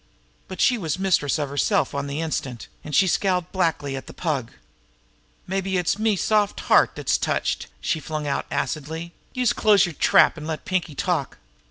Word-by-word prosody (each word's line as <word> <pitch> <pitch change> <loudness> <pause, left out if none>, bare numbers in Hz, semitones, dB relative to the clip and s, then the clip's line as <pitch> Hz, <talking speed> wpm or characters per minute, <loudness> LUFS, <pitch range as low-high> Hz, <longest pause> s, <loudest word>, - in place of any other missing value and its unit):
But 185 - -8
she 245 -3 +3
was 160 -5 -2
mistress 185 -7 +1
of 145 -2 -2
herself 140 0 +1
on 140 0 -3
the 140 +3 -3
instant, 135 -7 -4 0.2
and 150 -2 -4
she 195 - +6
scowled 180 -1 0
blackly 165 -7 0
at 135 - -7
the - - -11
Pug. 145 -9 -2 1.0
"Mabbe 190 0 -1
it's 180 +3 0
me 220 -1 +2
soft 210 +1 +1
heart - - +4
dat's - - 0
touched!" - - -1
she 160 - -1
flung 155 -1 -4
out 140 - -2
acidly. 160 +3 -3 0.2
"Youse 250 -1 +2
close 210 -4 +4
yer 175 - -4
trap, 155 - +4
an' 155 - -7
let 160 -1 -4
Pinkie 180 -5 -2
talk!" - - -1
165 Hz, 180 wpm, -23 LUFS, 150-190 Hz, 1.0 s, she